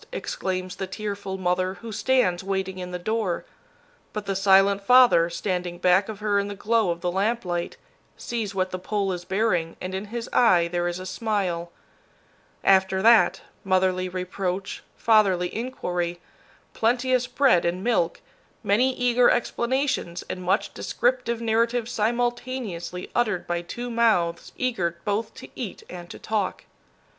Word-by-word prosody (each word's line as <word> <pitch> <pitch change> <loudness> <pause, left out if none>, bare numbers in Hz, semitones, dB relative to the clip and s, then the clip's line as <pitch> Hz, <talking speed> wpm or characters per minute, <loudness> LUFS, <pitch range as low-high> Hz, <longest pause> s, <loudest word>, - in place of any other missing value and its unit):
exclaims 185 -1 -4
the 190 - -3
tearful 200 -1 -5
mother 185 0 0
who 225 +5 -9
stands 210 -5 +1
waiting 190 -1 -2
in 180 0 -5
the 180 - -4
door. 205 -1 -2 0.7
But 210 -1 -4
the 195 -1 -2
silent 195 +1 +4
father, 240 -7 +6
standing 180 0 -3
back 185 +4 +3
of 210 -1 -7
her 205 -1 +2
in 200 - -1
the 205 - -6
glow 220 0 +1
of 170 0 -2
the 175 - -1
lamplight, 190 -3 -1 0.4
sees 225 -5 -4
what 185 -1 0
the 185 - -4
pole 200 +1 -1
is 175 -1 -5
bearing, 180 -4 0
and 185 +1 -5
in 190 +2 -3
his 230 +2 -5
eye 180 -8 +5
there 175 0 -1
is 175 0 -2
a 185 - -7
smile. 185 -5 -2 0.9
After 190 0 +3
that, 230 0 +5 0.2
motherly 185 -1 +1
reproach, 185 +1 -3 0.2
fatherly 195 -6 +3
inquiry, 175 -8 -3 0.5
plenteous 250 +2 +1
bread 255 -11 +3
and 180 +2 -1
milk, 190 -8 +1 0.4
many 250 +6 +2
eager 245 0 +4
explanations 245 -6 0
and 185 - -5
much 190 +4 0
descriptive 240 -2 -1
narrative 230 +1 +1
simultaneously 235 -6 -2
uttered 215 -7 0
by 175 0 -2
two 240 +8 -6
mouths 210 -8 +1
eager 185 -10 -1
both 215 +2 -2
to - - -10
eat 230 -7 -6
and 175 -1 -9
to - - -8
talk. 210 -4 -2
195 Hz, 150 wpm, -25 LUFS, 180-230 Hz, 0.9 s, father